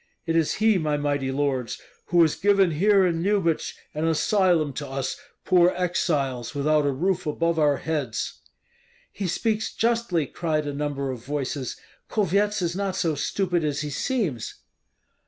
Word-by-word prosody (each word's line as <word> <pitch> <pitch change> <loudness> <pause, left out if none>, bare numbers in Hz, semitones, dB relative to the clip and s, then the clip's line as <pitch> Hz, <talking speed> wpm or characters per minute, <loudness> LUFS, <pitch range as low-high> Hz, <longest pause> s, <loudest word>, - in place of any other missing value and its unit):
It 165 -1 -1
is 165 -2 +2
he, 215 -2 +3
my 150 -2 0
mighty 145 -2 -1
lords, 135 -3 -1 0.3
who 175 -1 +5
has 155 - +2
given 195 -3 +3
here 195 +4 +4
in 165 -2 0
Lyubich 190 -4 0 0.2
an 155 +2 -1
asylum 165 -2 +2
to 145 +2 -5
us 135 0 -3 0.3
poor 180 -1 +5
exiles 145 -8 -1
without 150 +1 +2
a - - +2
roof 180 +5 -1
above 165 +2 0
our 145 -2 +3
heads." 145 -8 -3 0.7
"He 195 -2 -4
speaks 215 +4 -1
justly," 230 -9 +1
cried 155 +1 -2
a 145 - -3
number 140 -2 -2
of 120 -3 -7
voices; 140 -1 -3 0.3
"Kulvyets 205 0 +1
is 170 0 -1
not 195 -1 -2
so 165 -4 0
stupid 175 +3 -1
as 145 -1 -1
he 150 -1 -4
seems." 180 - -2
160 Hz, 155 wpm, -25 LUFS, 145-185 Hz, 0.7 s, who